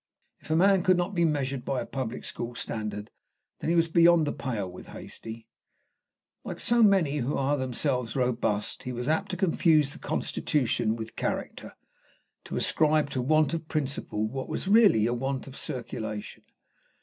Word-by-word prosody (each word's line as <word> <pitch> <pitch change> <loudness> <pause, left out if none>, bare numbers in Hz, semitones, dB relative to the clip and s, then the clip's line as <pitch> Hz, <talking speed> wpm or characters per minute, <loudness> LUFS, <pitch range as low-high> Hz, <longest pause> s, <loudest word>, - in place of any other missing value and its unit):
If - - -16
a 155 - +2
man 190 +2 +5
could 185 0 +4
not 180 +3 -1
be 170 -2 +2
measured 140 -4 -1
by 135 - -1
a - - -3
public 125 -3 -5
school 120 +1 -5
standard, 105 -3 -4 0.5
then - - -2
he 170 - +3
was 165 0 +4
beyond 170 -1 +5
the 145 - -2
pale 115 -8 -3
with 90 0 -11
Hastie. 115 0 -9 1.0
Like - - -6
so 240 0 +2
many 190 -9 +4
who 135 +1 -1
are 140 +2 +1
themselves 125 -2 -1
robust, 120 -5 0
he 125 - -5
was 120 +1 -4
apt 160 +6 +1
to 185 - -3
confuse 160 -5 +3
the - - -10
constitution 120 -5 0
with 110 -1 -6
the - - -23
character, - - -4 0.7
to - - -4
ascribe 155 -2 +2
to 130 - -1
want 155 +4 +3
of 165 -1 -3
principle 135 -8 -2
what 130 +3 -5
was - - -3
really 200 - +5
a 120 - +1
want 135 +2 -2
of 135 - -11
circulation. 110 -5 -5
135 Hz, 175 wpm, -28 LUFS, 120-165 Hz, 1.0 s, man